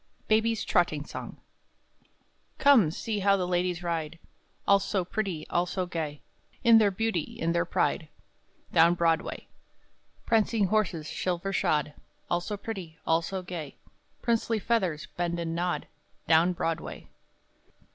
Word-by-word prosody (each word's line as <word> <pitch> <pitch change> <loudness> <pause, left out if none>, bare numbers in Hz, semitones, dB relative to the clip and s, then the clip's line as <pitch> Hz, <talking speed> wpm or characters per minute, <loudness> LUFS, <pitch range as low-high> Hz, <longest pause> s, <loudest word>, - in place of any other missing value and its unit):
] - - -38
[Daintily] 220 +1 +3 2.0
Come, 265 - +6
see 210 +5 -3
how 200 0 +4
the 180 -2 -1
ladies 180 0 0
ride, 165 -2 -2 0.5
All 200 0 +6
so 195 -2 -1
pretty, 185 -5 -3
all 175 +1 +2
so 185 0 -2
gay, 155 -4 -4 0.4
In 230 -2 +8
their 210 -2 +4
beauty, 195 -4 -2
in 165 +1 +1
their 170 +1 +1
pride, 165 -1 0 0.7
Down 170 +1 +6
Broadway; 165 -1 0 0.8
Prancing 225 -1 +2
horses 180 -6 0
silver 185 +2 -2
shod, 150 -5 +1 0.4
All 175 0 +2
so 205 +3 -4
pretty, 190 -7 -7
all 165 +1 +3
so 185 +2 -4
gay; 170 -5 -6 0.5
Princely 230 -1 +1
feathers 190 -9 0
bend 175 -1 -1
and 165 -1 -2
nod, 175 +1 -1 0.4
Down 165 +2 +5
Broadway. 165 -1 -4
180 Hz, 130 wpm, -28 LUFS, 165-205 Hz, 2.0 s, In